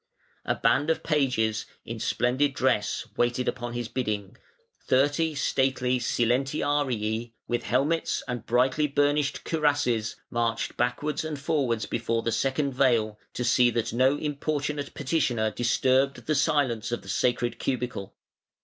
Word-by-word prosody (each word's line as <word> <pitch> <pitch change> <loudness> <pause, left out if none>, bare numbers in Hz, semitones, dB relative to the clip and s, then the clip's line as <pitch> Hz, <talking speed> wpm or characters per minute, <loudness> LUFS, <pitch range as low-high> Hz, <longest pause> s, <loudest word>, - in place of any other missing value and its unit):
A - - +1
band 130 +7 +2
of 160 - 0
pages, 125 -8 +1 0.2
in - - -6
splendid 130 +3 +1
dress, 125 -6 +1
waited 120 +1 +1
upon 120 0 -3
his 120 -1 -3
bidding; 105 -5 -3 0.5
thirty 145 +4 +2
stately 130 -2 +1
silentiarii, 120 -2 0
with 120 0 0
helmets 140 +8 0
and 120 -3 -4
brightly 130 +5 +2
burnished 145 0 +1
cuirasses, 145 -8 +1 0.2
marched 115 -1 -1
backwards 125 +6 -1
and 155 -2 -4
forwards 135 -6 0
before 115 0 -1
the 115 - 0
second 135 +3 0
veil, 115 -5 +2 0.2
to 125 - -2
see 120 0 +4
that 115 -2 -2
no 130 +4 +3
importunate 145 -1 -3
petitioner 125 -7 0
disturbed 130 +4 +1
the 155 - +1
silence 130 -6 +1
of 120 - -3
"the - - -14
sacred 120 -1 0
cubicle". 125 -6 -3
125 Hz, 130 wpm, -27 LUFS, 120-145 Hz, 0.5 s, see